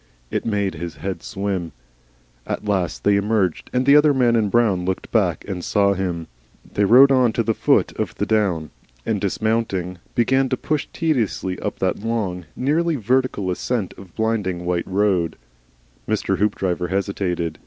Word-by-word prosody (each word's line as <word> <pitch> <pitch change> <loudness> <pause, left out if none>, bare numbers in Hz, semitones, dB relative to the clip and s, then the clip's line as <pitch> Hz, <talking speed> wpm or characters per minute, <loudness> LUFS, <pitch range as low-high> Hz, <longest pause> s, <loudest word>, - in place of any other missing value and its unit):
It - - -2
made 100 -3 0
his 80 0 -6
head 90 +2 -5
swim. 95 -5 -3 0.7
At - - -3
last 95 -6 -1
they 100 0 +4
emerged, 100 -4 0
and 125 +1 +1
the 140 +1 +6
other 150 -1 +5
man 120 -3 +3
in 110 -3 +2
brown 105 -5 +2
looked 95 +1 -3
back 95 -7 +1
and 95 -3 -4
saw 100 -1 +2
him. 90 -4 -3 0.5
They 100 - +2
rode 130 +7 +7
on 125 -4 +4
to 115 - 0
the 115 - +1
foot - - +2
of - - -2
the - - -1
down, 95 -8 0 0.3
and 105 -3 -1
dismounting 100 -3 -1 0.2
began 130 +3 +2
to 130 - 0
push 155 -2 -2
tediously 115 - -1
up - - -4
that - - -1
long 100 -5 -2
nearly 160 +5 +1
vertical 125 -5 0
ascent 105 +2 -2
of 95 -3 -14
blinding 105 -6 -1
white 85 -1 -1
road, 95 -4 +1 0.7
Mr. 100 -3 0
Hoopdriver 95 -4 0
hesitated. 90 -4 -2
100 Hz, 165 wpm, -21 LUFS, 90-115 Hz, 0.7 s, rode